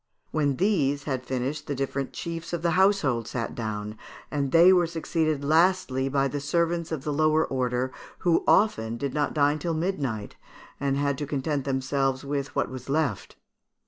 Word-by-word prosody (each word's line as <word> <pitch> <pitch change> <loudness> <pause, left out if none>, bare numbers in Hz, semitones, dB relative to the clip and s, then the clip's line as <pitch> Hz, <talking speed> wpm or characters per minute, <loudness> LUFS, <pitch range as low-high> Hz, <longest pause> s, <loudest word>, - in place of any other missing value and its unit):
When 145 -3 +1
these 145 -7 +1
had 130 -4 -3
finished 130 +4 -3
the 145 - -2
different 135 0 -2
chiefs 165 0 -6
of 170 -1 -2
the 170 - +2
household 165 - +2
sat 115 0 -3
down, 105 -1 -5 0.3
and 140 -2 -1
they 170 +3 +7
were 175 -2 +3
succeeded 160 -3 -1
lastly 155 -4 +2
by 135 0 +2
servants 165 +4 -1
of 155 -5 -3
the 150 - -2
lower 155 +1 +3
order, 125 0 -1 0.3
who 170 -2 +3
often 115 - +3
did 140 +2 -3
not 150 0 -1
dine 145 +1 +3
till 165 +2 -2
midnight, 140 - -2 0.4
and 140 -1 0
had 140 -1 0
to 145 - -3
content 140 -1 -2
themselves 135 0 0
with 140 0 -3
what - - +1
was 130 0 -8
left. 140 -8 -1
145 Hz, 170 wpm, -26 LUFS, 130-160 Hz, 0.4 s, they